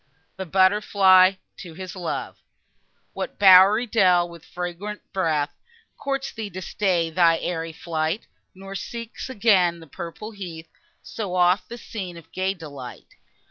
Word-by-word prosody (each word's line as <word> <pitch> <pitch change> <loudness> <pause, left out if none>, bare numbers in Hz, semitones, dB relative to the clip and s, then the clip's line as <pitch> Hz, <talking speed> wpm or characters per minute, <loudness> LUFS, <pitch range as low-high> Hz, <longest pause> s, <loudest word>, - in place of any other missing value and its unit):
THE 190 - -6
BUTTER 190 +4 +4
FLY 190 -2 +5 0.2
TO 170 -4 -10
HIS 185 +1 -8
LOVE 175 -3 -5 0.7
What - - -5
bowery 195 +4 +7
dell, 185 -6 +3
with 170 -2 -13
fragrant 180 +4 -6
breath, 160 -6 0 0.4
Courts 275 -1 -3
thee 220 -2 -6
to 185 0 -7
stay 175 -5 0
thy 165 0 +4
airy 165 -1 -3
flight; 160 +3 -3 0.3
Nor 195 +1 -9
seek 230 +3 -6 0.2
again 195 -8 +3
the 165 - -12
purple 170 +8 -8
heath, 170 -6 -8 0.3
So 200 -5 -5
oft 180 +1 +3
the 235 - -7
scene 190 -7 -7
of 165 - -15
gay 190 +1 -1
delight? 140 -8 -10
185 Hz, 140 wpm, -24 LUFS, 170-200 Hz, 0.7 s, bowery